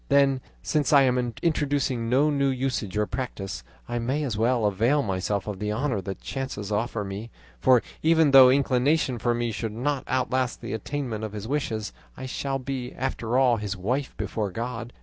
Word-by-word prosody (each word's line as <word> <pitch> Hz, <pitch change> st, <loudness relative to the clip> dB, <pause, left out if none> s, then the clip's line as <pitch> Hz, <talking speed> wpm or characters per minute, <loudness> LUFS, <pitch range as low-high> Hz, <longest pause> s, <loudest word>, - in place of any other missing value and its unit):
Then, 140 Hz, -2 st, +4 dB, 0.2 s
since 150 Hz, -2 st, +1 dB
I 140 Hz, -2 st, +7 dB
am 125 Hz, -2 st, +1 dB
introducing 140 Hz, -7 st, 0 dB
no 140 Hz, +5 st, +3 dB
new 140 Hz, -1 st, +2 dB
usage 130 Hz, -7 st, -2 dB
or 105 Hz, -, +2 dB
practice, 115 Hz, -5 st, -5 dB, 0.2 s
I 120 Hz, 0 st, -2 dB
may 130 Hz, +6 st, -1 dB
as 125 Hz, -7 st, -2 dB
well 115 Hz, +1 st, +2 dB
avail 115 Hz, +9 st, +2 dB
myself 95 Hz, 0 st, -1 dB
of 105 Hz, -3 st, -5 dB
the 105 Hz, +1 st, -2 dB
honour 115 Hz, -1 st, -1 dB
that 95 Hz, 0 st, -6 dB
chance 135 Hz, -3 st, -4 dB
offers 105 Hz, 0 st, -1 dB
me, 100 Hz, +4 st, -6 dB, 0.3 s
for 125 Hz, -, +5 dB, 0.2 s
even 160 Hz, -2 st, +4 dB
though 135 Hz, -2 st, +9 dB
his 130 Hz, -, +5 dB
inclination 135 Hz, 0 st, +1 dB
for 120 Hz, +1 st, +1 dB
me 120 Hz, -1 st, -1 dB
should 110 Hz, 0 st, -4 dB
not 135 Hz, +4 st, -1 dB
outlast 130 Hz, -1 st, 0 dB
the -, -, -5 dB
attainment 115 Hz, -1 st, -3 dB
of 110 Hz, -1 st, -4 dB
his 105 Hz, 0 st, -6 dB
wishes, 115 Hz, -6 st, -2 dB, 0.2 s
I 130 Hz, -, -6 dB
shall 135 Hz, +1 st, -2 dB
be, 130 Hz, -1 st, -5 dB
after 125 Hz, -2 st, -2 dB
all, 125 Hz, -3 st, +4 dB
his 100 Hz, -2 st, -4 dB
wife 125 Hz, +9 st, -2 dB
before 105 Hz, -3 st, -2 dB
God. 115 Hz, +4 st, -5 dB
125 Hz, 190 wpm, -26 LUFS, 110-135 Hz, 0.3 s, though